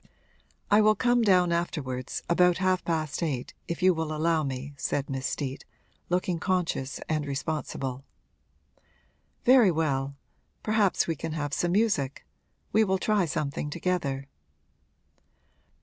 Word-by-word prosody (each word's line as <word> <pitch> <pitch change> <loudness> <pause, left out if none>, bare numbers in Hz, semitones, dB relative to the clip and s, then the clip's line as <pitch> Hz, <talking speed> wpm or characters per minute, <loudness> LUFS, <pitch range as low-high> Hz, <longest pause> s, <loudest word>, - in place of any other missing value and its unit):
'I 210 +1 +7
will 215 0 +5
come 245 +2 +3
down 180 -5 +4
afterwards, 145 -7 -2
about 180 0 +4
half 185 -1 +1
past 155 -2 -2
eight, 140 -7 -2
if 170 +2 -4
you 185 0 +6
will 160 -2 -3
allow 160 +1 +1
me,' 135 0 -4
said 140 0 -2
Miss 135 -1 -2
Steet, 135 -2 -4 0.5
looking 180 -1 0
conscious 170 -7 -1
and 155 -1 0
responsible. 135 -2 -3 1.4
'Very 250 -5 +7
well 140 -4 0 0.5
perhaps 215 -3 +2
we 165 - -1
can 160 +2 -5
have 145 -2 -3
some 175 +4 0
music; 190 - +1 0.5
we 220 +2 +5
will 190 -2 +1
try 205 -1 +2
something 150 -1 -2
together.' 145 -5 -2
165 Hz, 130 wpm, -27 LUFS, 140-185 Hz, 1.4 s, I